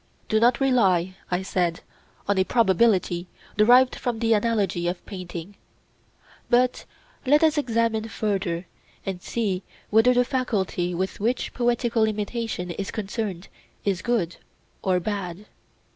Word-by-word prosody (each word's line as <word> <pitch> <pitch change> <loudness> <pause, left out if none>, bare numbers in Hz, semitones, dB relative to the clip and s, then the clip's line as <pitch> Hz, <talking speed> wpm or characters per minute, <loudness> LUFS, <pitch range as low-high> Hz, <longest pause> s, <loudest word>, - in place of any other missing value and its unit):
Do 215 - +3
not 235 +2 +4
rely, 195 -10 +3 0.2
I 180 +1 -1
said, 175 -3 -1 0.5
on 200 -1 +2
a - - +5
probability 190 -5 +2 0.3
derived 245 +5 +5
from 240 -2 -2
the 225 0 +2
analogy 205 -5 +1
of 175 0 -3
painting; 180 0 -8 0.9
but 250 0 +2 0.4
let 295 +4 +4
us 315 -1 +4
examine 230 -5 0
further 195 -5 -2 0.4
and 190 -2 -4
see 200 -5 -2 0.3
whether 225 +4 +5
the 245 0 +4
faculty 200 -9 -1
with 185 +2 -3
which 235 +5 -1
poetical 240 -2 +1
imitation 215 -3 -3
is 195 +3 -4
concerned 200 -3 -4 0.4
is 195 -3 0
good 210 -8 -1 0.4
or 185 -1 +2
bad. 195 0 -4
210 Hz, 130 wpm, -25 LUFS, 185-235 Hz, 0.9 s, a